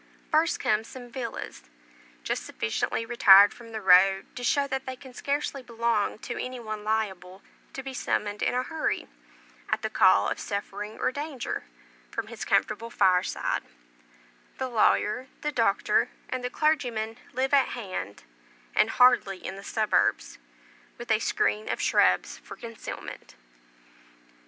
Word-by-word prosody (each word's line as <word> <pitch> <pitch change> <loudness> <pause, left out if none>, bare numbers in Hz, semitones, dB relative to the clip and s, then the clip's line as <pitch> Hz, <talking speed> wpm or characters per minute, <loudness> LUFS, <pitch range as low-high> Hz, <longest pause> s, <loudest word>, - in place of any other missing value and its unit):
First 320 +1 +2
come 215 0 +1
some 245 0 -11
villas; 230 - -6 0.6
just - - -2
sufficiently 110 - -2
retired 205 -4 +7
from 230 -1 -13
the 220 -1 -5
road 190 +1 +5
to 245 - -6
show 280 +3 +2
that 265 -1 -4
they 260 - -4
can 260 0 -13
scarcely 280 +1 -2
belong 235 -4 -1
to 240 - -4
any 255 0 -6
one 215 -2 -6
liable 195 -4 -2 0.3
to 270 - -6
be 270 0 -6
summoned 210 -4 -2
in - - +1
a 250 - +1
hurry, 320 +3 -2 0.6
at - - -1
the - - -2
call - - +5
of - - -2
suffering 205 +1 -5
or - - 0
danger, 285 -1 -4 0.4
from - - -5
his - - -6
comfortable 230 +1 0
fireside; 185 -5 +1 1.0
the 260 - -2
lawyer, 240 +2 +2
the 300 - -1
doctor, 230 -7 +2 0.2
and 255 -1 -3
the 250 - -1
clergyman, 245 -8 0
live 265 +2 -1
at 275 -2 +5
hand, 185 - -6 0.5
and - - +3
hardly 245 -6 +4
in 190 - -4
the 195 - -10
suburbs, 215 0 0 0.6
with 240 -1 -5
a 220 - +4
screen 215 -1 0
of - - -2
shrubs - - +2
for - - -11
concealment. 230 -1 -9
230 Hz, 145 wpm, -27 LUFS, 210-260 Hz, 1.0 s, retired